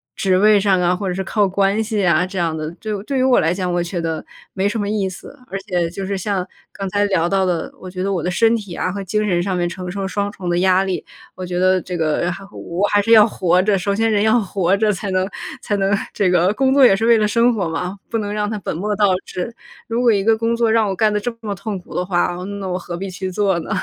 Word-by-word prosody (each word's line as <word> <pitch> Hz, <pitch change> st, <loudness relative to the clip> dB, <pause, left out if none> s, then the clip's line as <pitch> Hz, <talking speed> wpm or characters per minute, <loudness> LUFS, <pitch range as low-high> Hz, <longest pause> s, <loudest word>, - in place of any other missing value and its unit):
职 190 Hz, -2 st, +1 dB
位 210 Hz, +1 st, +5 dB
上 195 Hz, -2 st, +2 dB
啊， 175 Hz, +1 st, +2 dB
或 195 Hz, +2 st, -4 dB
者 180 Hz, -, -1 dB
是 190 Hz, +1 st, -3 dB
靠 205 Hz, -1 st, +1 dB
关 195 Hz, +3 st, +1 dB
系 215 Hz, -2 st, -1 dB
啊， 170 Hz, +1 st, +3 dB
这 190 Hz, 0 st, -5 dB
样 165 Hz, -2 st, 0 dB
的， 155 Hz, 0 st, -4 dB
对 215 Hz, -, -5 dB
对 270 Hz, +3 st, -2 dB
于 255 Hz, -, +2 dB
我 260 Hz, -1 st, +4 dB
来 165 Hz, +2 st, +2 dB
讲， 180 Hz, -1 st, -2 dB
我 175 Hz, 0 st, 0 dB
觉 175 Hz, 0 st, -4 dB
得 160 Hz, -1 st, -3 dB, 0.3 s
没 195 Hz, +1 st, 0 dB
什 215 Hz, +2 st, -2 dB
么 200 Hz, -, -2 dB
意 205 Hz, -2 st, 0 dB
思。 190 Hz, +9 st, -10 dB
而 195 Hz, -, -4 dB
且 180 Hz, -4 st, -1 dB
就 190 Hz, +2 st, -5 dB
是 200 Hz, 0 st, -2 dB
像 190 Hz, -1 st, -2 dB, 0.3 s
刚 195 Hz, -1 st, -4 dB
才 205 Hz, +2 st, +1 dB
聊 175 Hz, -4 st, +1 dB
到 195 Hz, 0 st, +2 dB
的， 175 Hz, -3 st, -2 dB
我 185 Hz, -, -9 dB
觉 185 Hz, 0 st, -6 dB
得 195 Hz, +1 st, -1 dB
我 175 Hz, -5 st, -1 dB
的 180 Hz, -, -1 dB
身 225 Hz, +5 st, +3 dB
体 200 Hz, -6 st, -6 dB
啊 185 Hz, -, -1 dB
和 200 Hz, +1 st, -5 dB
精 210 Hz, +3 st, -1 dB
神 175 Hz, -2 st, +2 dB
上 190 Hz, -1 st, -1 dB
面 175 Hz, -1 st, 0 dB
承 180 Hz, +1 st, -6 dB
受 195 Hz, 0 st, -3 dB
双 200 Hz, +1 st, -2 dB
重 185 Hz, -4 st, -6 dB
的 175 Hz, -, +1 dB
压 185 Hz, +1 st, +3 dB
力， 190 Hz, -2 st, -3 dB, 0.3 s
我 185 Hz, -, -6 dB
觉 180 Hz, 0 st, -3 dB
得 185 Hz, 0 st, +3 dB
这 180 Hz, -, -5 dB
个 165 Hz, +1 st, 0 dB
还 195 Hz, -, -8 dB
好 200 Hz, -, -14 dB
我 175 Hz, +4 st, -3 dB
还 205 Hz, -, +4 dB
是 225 Hz, +3 st, 0 dB
要 215 Hz, -1 st, +8 dB
活 180 Hz, -4 st, +2 dB
着， 200 Hz, 0 st, +2 dB
首 200 Hz, +2 st, -1 dB
先 225 Hz, +2 st, +1 dB
人 205 Hz, 0 st, +2 dB
要 220 Hz, +2 st, +4 dB
活 190 Hz, -2 st, +1 dB
着 210 Hz, +1 st, +2 dB
才 195 Hz, 0 st, -4 dB
能， 185 Hz, 0 st, +1 dB, 0.3 s
才 205 Hz, -, -1 dB
能 195 Hz, 0 st, +2 dB, 0.2 s
这 190 Hz, -3 st, +1 dB
个 180 Hz, +2 st, +3 dB
工 265 Hz, 0 st, +2 dB
作 280 Hz, -, +5 dB
也 220 Hz, -6 st, +7 dB
是 220 Hz, +4 st, -1 dB
为 230 Hz, -1 st, +6 dB
了 210 Hz, -, +2 dB
生 235 Hz, +3 st, +3 dB
活 195 Hz, -7 st, -1 dB
嘛， 180 Hz, +4 st, -4 dB
不 230 Hz, -, -1 dB
能 205 Hz, -1 st, -3 dB
让 210 Hz, 0 st, -1 dB
它 220 Hz, -, -3 dB
本 185 Hz, -, -4 dB
末 205 Hz, +5 st, -2 dB
倒 205 Hz, 0 st, +3 dB, 0.2 s
置。 230 Hz, +6 st, -5 dB, 0.3 s
如 230 Hz, +1 st, -1 dB
果 240 Hz, -2 st, +5 dB
一 200 Hz, -2 st, +1 dB
个 225 Hz, +1 st, +4 dB
工 230 Hz, +1 st, 0 dB
作 230 Hz, -1 st, +2 dB
让 220 Hz, -2 st, +3 dB
我 190 Hz, -, -2 dB
干 215 Hz, +1 st, +2 dB
得 210 Hz, -, +1 dB
这 235 Hz, +2 st, -4 dB
么 210 Hz, -2 st, -3 dB
痛 200 Hz, +1 st, -5 dB
苦 175 Hz, -, -14 dB
的 180 Hz, -, -1 dB
话， 175 Hz, -1 st, 0 dB
呃， 180 Hz, -, -6 dB
那 200 Hz, -1 st, -5 dB
我 180 Hz, -, -2 dB
何 175 Hz, -1 st, -6 dB
必 195 Hz, +2 st, -5 dB
去 185 Hz, +1 st, -5 dB
做 195 Hz, -2 st, +1 dB
呢？ 160 Hz, -, -8 dB
195 Hz, 310 characters per minute, -19 LUFS, 180-210 Hz, 0.3 s, 要